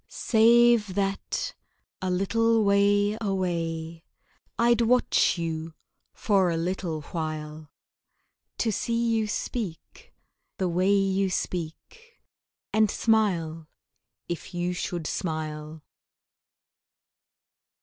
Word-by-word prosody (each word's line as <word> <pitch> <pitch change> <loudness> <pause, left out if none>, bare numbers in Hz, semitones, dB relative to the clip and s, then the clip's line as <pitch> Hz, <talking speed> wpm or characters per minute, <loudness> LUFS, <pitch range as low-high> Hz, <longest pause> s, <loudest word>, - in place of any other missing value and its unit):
Save 230 -3 +4
that, 195 -1 -2 0.5
a 185 - -1
little 225 +5 +2
way 205 +1 +3
away, 170 -4 -2 0.5
I'd 235 0 +3
watch 240 -4 +3
you 165 -1 -4 0.4
for 195 -4 +2
a 165 - -1
little 170 -2 -2
while, 155 -2 -5 0.9
To 225 - 0
see 230 +3 -2 0.2
you 220 -1 0
speak, 210 -5 -5 0.5
the 190 - 0
way 180 +3 +1
you 195 -1 +2
speak, 185 - -5 0.5
And 215 -1 +4
smile, 175 -9 0 0.6
if 175 +1 -6
you 175 +1 -1
should 175 -2 -4
smile. 155 -2 -4
185 Hz, 90 wpm, -26 LUFS, 165-215 Hz, 0.9 s, Save